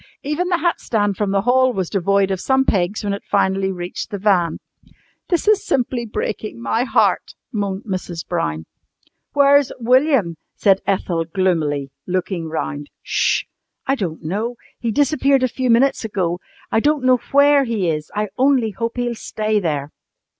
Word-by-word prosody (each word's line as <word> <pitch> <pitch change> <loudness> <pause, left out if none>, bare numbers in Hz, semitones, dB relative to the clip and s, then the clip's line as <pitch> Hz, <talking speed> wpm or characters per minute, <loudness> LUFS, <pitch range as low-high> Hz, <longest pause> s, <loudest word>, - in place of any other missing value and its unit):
Even 300 +5 -1
the 350 - +2
hat 345 0 0
stand 205 -3 0
from 205 +1 -1
the 195 0 +2
hall 255 +2 +3
was 190 -4 -2
devoid 195 +1 +1
of 190 -1 -2
some 265 0 +2
pegs 195 +1 0
when 200 -1 -1
it 200 - -4
finally 190 -1 +1
reached 180 0 -5
the 205 - -4
van. 185 -5 +2 0.7
"This 350 +2 0
is 425 -1 +4
simply 245 -2 -1
breaking 215 - -4
my 170 - 0
heart," - - +1 0.2
moaned 200 -3 -2
Mrs. 185 -4 -5
Brown. 80 - -2 0.7
"Where's 285 -1 +5
William?" 250 - +3 0.2
said 195 -2 +3
Ethel, 175 -4 0
gloomily, 160 -6 0 0.2
looking 180 -2 -2
round. 145 -2 -4
"'Sh! - - +1 0.4
I 270 - +1
don't 185 -11 -3
know. 210 +9 -2 0.2
He 235 - -2
disappeared 275 +1 +2
a - - +4
few 255 +1 -2
minutes 240 +4 +3
ago. 180 -5 -1 0.3
I - - +3
don't 295 +2 +1
know 255 0 +5
where 285 0 +5
he 220 -6 -1
is. 155 -2 -2
I 210 0 -1
only 260 -4 +3
hope 230 +4 -3
he'll 245 -1 -1
stay 215 -1 -1
there!" 150 -5 -2
210 Hz, 165 wpm, -20 LUFS, 180-255 Hz, 0.7 s, Where's